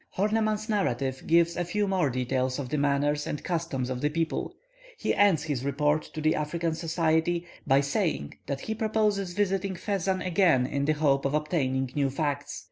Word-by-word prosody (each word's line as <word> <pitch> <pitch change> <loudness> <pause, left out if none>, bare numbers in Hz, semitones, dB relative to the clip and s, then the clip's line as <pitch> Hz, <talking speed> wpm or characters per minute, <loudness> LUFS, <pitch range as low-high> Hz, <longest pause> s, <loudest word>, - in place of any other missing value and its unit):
Horneman's 215 +1 +1
narrative 140 - -1
gives 170 +1 +4
a 175 - 0
few 205 +4 -1
more 185 -6 +1
details 130 +1 -1
of 135 -3 -4
the 150 - -1
manners 145 +1 +1
and 150 - -4
customs 165 -7 -2
of 125 -1 -4
the 150 - +2
people. 165 +1 -2 0.4
He - - 0
ends 195 -7 +4
his 145 -5 -2
report 145 +2 +1
to 155 - -3
the 155 +1 +3
African 165 +2 -1
Society 165 +1 0 0.2
by 135 0 +5
saying 135 - -1
that 140 -1 -3
he 220 - -3
proposes 215 -4 0
visiting 195 -1 0
Fezzan 190 0 -1
again 170 -8 +3
in 140 +1 -1
the 155 - +3
hope 145 -3 +2
of 140 +2 0
obtaining 135 -5 0
new 140 -2 +1
facts. 140 0 -2
155 Hz, 180 wpm, -27 LUFS, 140-185 Hz, 0.4 s, by